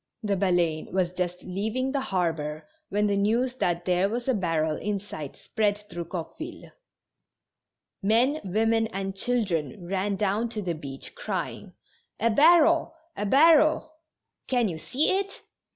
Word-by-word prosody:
The 205 Hz, -2 st, +1 dB
Baleine 175 Hz, -4 st, +1 dB
was 185 Hz, -2 st, +1 dB
just 180 Hz, -1 st, -3 dB
leaving 220 Hz, +8 st, -2 dB
the 280 Hz, -, 0 dB
harbor 165 Hz, -, -2 dB, 0.2 s
when 210 Hz, +1 st, +1 dB
the 205 Hz, -1 st, +1 dB
news 230 Hz, +6 st, +1 dB
that 175 Hz, -5 st, 0 dB
there 180 Hz, +2 st, +2 dB
was 240 Hz, +3 st, -3 dB
a 260 Hz, -, +3 dB
barrel 165 Hz, -6 st, 0 dB
in 205 Hz, -1 st, -2 dB
sight 155 Hz, -8 st, -8 dB
spread 210 Hz, -2 st, 0 dB
through 170 Hz, 0 st, -4 dB
Coqueville. 180 Hz, -, -7 dB, 1.3 s
Men, 240 Hz, +9 st, +2 dB
women 225 Hz, +3 st, +1 dB
and 195 Hz, -2 st, -4 dB
children 195 Hz, -, -1 dB
ran 195 Hz, +2 st, -1 dB
down 210 Hz, +4 st, 0 dB
to 220 Hz, -2 st, -3 dB
the 175 Hz, -2 st, -1 dB
beach, 140 Hz, -4 st, -7 dB
crying: -, -, -5 dB, 0.2 s
" -, -, -42 dB
A 230 Hz, -, +2 dB
barrel! 325 Hz, +6 st, +5 dB, 0.2 s
a 205 Hz, -, -2 dB
barrel! 310 Hz, +4 st, +5 dB, 0.2 s
" -, -, -60 dB
" -, -, -55 dB
Can 245 Hz, -3 st, +2 dB
you 160 Hz, -3 st, -5 dB
see 295 Hz, -, +2 dB
it 395 Hz, 0 st, -6 dB
200 Hz, 155 wpm, -26 LUFS, 175-245 Hz, 1.3 s, barrel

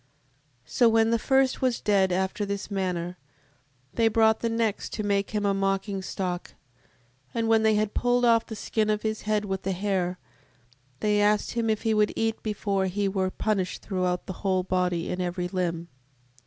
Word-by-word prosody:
7:7. -, -, -21 dB
So 240 Hz, -2 st, +5 dB
when 225 Hz, 0 st, +3 dB
the 230 Hz, -, +2 dB
first 265 Hz, +2 st, +2 dB
was 255 Hz, -2 st, +1 dB
dead 195 Hz, -3 st, +2 dB
after 190 Hz, +3 st, -1 dB
this 200 Hz, 0 st, -4 dB
manner, 180 Hz, -2 st, -2 dB, 0.7 s
they 230 Hz, -, +3 dB
brought 220 Hz, 0 st, +3 dB
the 230 Hz, -, -1 dB
next 225 Hz, -2 st, -1 dB
to 215 Hz, -, -3 dB
make 200 Hz, -1 st, 0 dB
him 210 Hz, -2 st, -1 dB
a 200 Hz, -, +2 dB
mocking 195 Hz, 0 st, -1 dB
stock: 185 Hz, -1 st, -4 dB, 0.8 s
and 230 Hz, -1 st, 0 dB
when 225 Hz, -1 st, +4 dB
they 220 Hz, -1 st, +3 dB
had 215 Hz, 0 st, 0 dB
pulled 245 Hz, 0 st, +2 dB
off 230 Hz, -1 st, +4 dB
the 220 Hz, -, -6 dB
skin 215 Hz, 0 st, -1 dB
of 210 Hz, 0 st, 0 dB
his 220 Hz, 0 st, -2 dB
head 210 Hz, -1 st, +1 dB
with 190 Hz, -1 st, -3 dB
the 190 Hz, 0 st, -2 dB
hair, 185 Hz, -2 st, -1 dB, 0.8 s
they 210 Hz, -1 st, +2 dB
asked 210 Hz, 0 st, +2 dB
him 230 Hz, -1 st, -1 dB
if 215 Hz, 0 st, 0 dB
he 225 Hz, -1 st, +2 dB
would 210 Hz, -1 st, +2 dB
eat, 225 Hz, 0 st, -1 dB
before 200 Hz, -3 st, -1 dB
he 200 Hz, +2 st, -1 dB
were 190 Hz, -1 st, 0 dB
punished 190 Hz, -2 st, -2 dB
throughout 180 Hz, -2 st, -1 dB
the 190 Hz, -, -5 dB
whole 185 Hz, -2 st, +1 dB
body 180 Hz, -2 st, 0 dB
in 180 Hz, -, -2 dB
every 180 Hz, 0 st, -2 dB
limb. 170 Hz, -2 st, -2 dB
205 Hz, 190 wpm, -26 LUFS, 185-220 Hz, 0.8 s, So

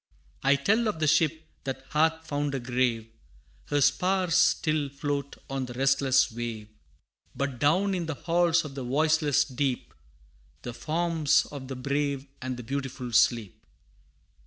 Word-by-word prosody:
I 140 Hz, +1 st, +4 dB
tell 220 Hz, +10 st, +2 dB
of 210 Hz, -, -1 dB
the 155 Hz, -, +1 dB
ship 160 Hz, +1 st, +2 dB, 0.2 s
that 135 Hz, 0 st, -5 dB
hath 160 Hz, +1 st, +1 dB
found 145 Hz, -1 st, -2 dB
a -, -, -1 dB
grave 120 Hz, -2 st, 0 dB, 0.6 s
Her 145 Hz, -1 st, 0 dB
spars 180 Hz, +5 st, +2 dB
still 155 Hz, -4 st, +2 dB
float 140 Hz, 0 st, -3 dB
on 135 Hz, -1 st, -3 dB
the 120 Hz, -, -8 dB
restless 135 Hz, 0 st, +3 dB
wave, 115 Hz, -2 st, -5 dB, 0.7 s
But 140 Hz, -3 st, -3 dB
down 185 Hz, +8 st, +2 dB
in 175 Hz, -3 st, -2 dB
the 160 Hz, -, -3 dB
halls 170 Hz, +1 st, +2 dB
of 145 Hz, -, -7 dB
the 135 Hz, -1 st, -5 dB
voiceless 150 Hz, +2 st, +2 dB
deep, 130 Hz, -1 st, -2 dB, 0.7 s
The 120 Hz, -, -5 dB
forms 160 Hz, +1 st, +1 dB
of 140 Hz, -3 st, -7 dB
the 135 Hz, -, -5 dB
brave 140 Hz, +1 st, -2 dB, 0.2 s
and 130 Hz, -1 st, -4 dB
the 125 Hz, -, -7 dB
beautiful 130 Hz, -1 st, -4 dB
sleep. 115 Hz, -3 st, +2 dB
140 Hz, 150 wpm, -27 LUFS, 130-160 Hz, 0.7 s, I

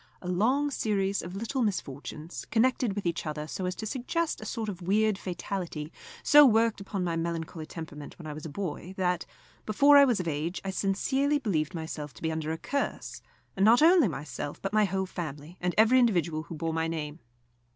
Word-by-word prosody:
A -, -, -6 dB
long 250 Hz, +11 st, +2 dB
series 200 Hz, -5 st, 0 dB
of 180 Hz, +2 st, -7 dB
little 230 Hz, +6 st, -2 dB
misfortunes, 155 Hz, -, -4 dB
connected 235 Hz, -1 st, +2 dB
with 205 Hz, -1 st, -4 dB
each 170 Hz, -1 st, -1 dB
other 150 Hz, 0 st, -3 dB
so 180 Hz, +4 st, -4 dB
as 180 Hz, -, -2 dB
to 220 Hz, -, -5 dB
suggest 285 Hz, +8 st, -2 dB
a -, -, -7 dB
sort 225 Hz, -3 st, -3 dB
of 190 Hz, -3 st, -5 dB
weird 210 Hz, +4 st, +2 dB
fatality, 175 Hz, -4 st, -4 dB, 0.3 s
so 295 Hz, 0 st, +8 dB
worked 225 Hz, -4 st, +4 dB
upon 195 Hz, -1 st, -3 dB
my 170 Hz, -2 st, -1 dB
melancholy 165 Hz, -1 st, -3 dB
temperament 150 Hz, -3 st, -8 dB
when 170 Hz, -, -11 dB
I 150 Hz, -, -5 dB
was 150 Hz, +1 st, -8 dB
a 160 Hz, -, -5 dB
boy 185 Hz, +2 st, -5 dB
that, 180 Hz, -2 st, 0 dB, 0.4 s
before 285 Hz, +7 st, +6 dB
I 280 Hz, -, +9 dB
was 245 Hz, -6 st, +2 dB
of 180 Hz, -, -3 dB
age, 160 Hz, +3 st, -2 dB
I 195 Hz, -, -1 dB
sincerely 265 Hz, +10 st, +1 dB
believed 180 Hz, -, -1 dB
myself 150 Hz, -4 st, -5 dB
to -, -, -13 dB
be 160 Hz, -, 0 dB
under 160 Hz, 0 st, -2 dB
a 160 Hz, -, -2 dB
curse, 280 Hz, +11 st, -3 dB, 0.3 s
and 195 Hz, -, +1 dB
not 235 Hz, +7 st, +6 dB
only 335 Hz, -5 st, +6 dB
myself, 145 Hz, -1 st, -5 dB
but 195 Hz, +1 st, -4 dB
my 215 Hz, -1 st, +4 dB
whole 190 Hz, -1 st, -1 dB
family, 155 Hz, -2 st, -6 dB
and 180 Hz, 0 st, -1 dB
every 225 Hz, +4 st, +6 dB
individual 175 Hz, -9 st, +2 dB
who 165 Hz, +1 st, -8 dB
bore 160 Hz, +1 st, -2 dB
my 160 Hz, 0 st, 0 dB
name. 155 Hz, -1 st, -4 dB
185 Hz, 205 wpm, -29 LUFS, 160-220 Hz, 0.4 s, I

